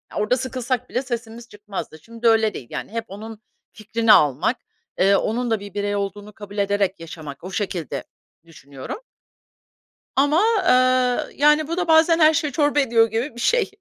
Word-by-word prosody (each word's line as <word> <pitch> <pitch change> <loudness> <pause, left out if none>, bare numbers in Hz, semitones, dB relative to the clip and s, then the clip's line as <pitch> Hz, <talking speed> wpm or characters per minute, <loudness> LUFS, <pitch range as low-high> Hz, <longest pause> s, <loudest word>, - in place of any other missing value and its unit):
Orada 210 +5 +1
sıkılsak 255 -1 -3
bile 250 - -1
sesimiz 235 -1 -6
çıkmazdı. 205 -6 -8
Şimdi 230 0 -3
öyle 220 -1 +3
değil, 120 - -8
yani, - - -6
hep 230 0 -4
onun 215 +2 -9 0.3
fikrini 220 +1 +2
almak, 150 - +3 0.4
eee, 195 +2 +5
onun 235 +3 -1
da 220 - +1
bir 200 -1 -10
birey 205 0 -2
olduğunu 205 +1 -5
kabul 205 0 -11
ederek 200 -1 0
yaşamak. 160 -3 -9
O 185 - -7
şekilde 185 -6 -3 0.4
düşünüyorum 140 - -9 1.2
ama, 290 +7 +3 0.3
eee, 255 0 +2
yani, 300 +1 +4
bu 335 - -2
da 360 -2 -2
bazen 325 +1 +5
her 310 0 +5
şeyi 305 -3 -1
çorba 290 -2 +2
ediyor 230 -4 +3
gibi 230 +3 -2
bir 240 - -8
şey. 470 - +2
225 Hz, 165 wpm, -22 LUFS, 200-255 Hz, 1.2 s, eee